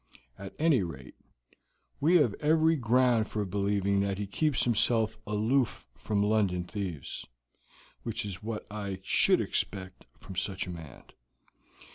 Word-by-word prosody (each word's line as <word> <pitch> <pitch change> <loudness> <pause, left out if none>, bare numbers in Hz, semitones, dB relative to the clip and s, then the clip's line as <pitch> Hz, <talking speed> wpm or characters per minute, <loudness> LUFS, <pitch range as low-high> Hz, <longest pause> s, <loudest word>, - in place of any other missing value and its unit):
At 95 0 -8
any 155 -7 +4
rate, 70 -8 -7 0.9
we 160 +5 +4
have 145 - +5
every 160 +2 +4
ground 125 -3 +3
for 105 -1 -2
believing 100 0 +1
that 100 -1 0
he 100 - -2
keeps 145 +8 0
himself 115 -1 +2
aloof 110 +5 +1
from 100 -1 0
London 100 -4 +2
thieves, 90 -7 -5 0.7
which - - -3
is 95 -4 -6
what 110 0 -4
I 100 -3 -4
should - - +4
expect 95 -1 -3
from 95 - -10
such 95 +1 -2
a 90 - -6
man. 80 -6 -10
105 Hz, 135 wpm, -30 LUFS, 95-120 Hz, 0.9 s, have